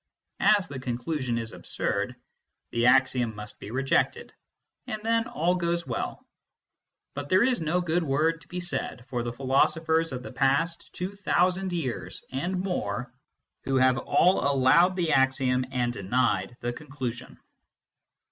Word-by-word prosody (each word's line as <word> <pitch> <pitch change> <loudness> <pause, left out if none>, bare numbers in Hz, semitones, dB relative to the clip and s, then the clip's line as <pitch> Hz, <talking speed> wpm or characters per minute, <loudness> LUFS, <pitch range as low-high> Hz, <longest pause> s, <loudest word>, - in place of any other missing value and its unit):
As 200 -4 -2
the 140 -3 -6
con 125 -2 -3
clusion 125 -2 -2
is 115 -1 -4
absurd, - - -3 0.6
the 120 +1 +2
axiom 125 -3 +3
must 105 0 -9
be 100 - -8
rejected, 135 - 0 0.5
and 215 -1 -4
then 230 0 +1
all 210 -8 +1
goes 170 -1 -1
well. 120 - -4 0.9
But 145 0 -6
there 185 +4 +5
is 250 -4 +1
no 165 +3 +1
good 175 0 +1
word 160 +2 +1
to - - -19
be 180 - -5
said 150 -8 -3
for 120 -2 -1
the 120 0 -3
philosophers 160 +6 +1
of 125 -1 -5
the - - -8
past 140 +6 0
two 185 +3 -4
thousand 185 -1 +1
years 155 -9 -4
and 175 +8 -2
more, 125 - -3 0.5
who 135 - 0
have 130 0 +4
all 175 +8 +3
allowed 140 +7 +4
the 170 -4 0
axiom 130 -1 +2
and 120 -2 0
denied 120 +3 0
the 120 0 -2
conclusion. 130 -4 -6
140 Hz, 150 wpm, -27 LUFS, 125-175 Hz, 0.9 s, there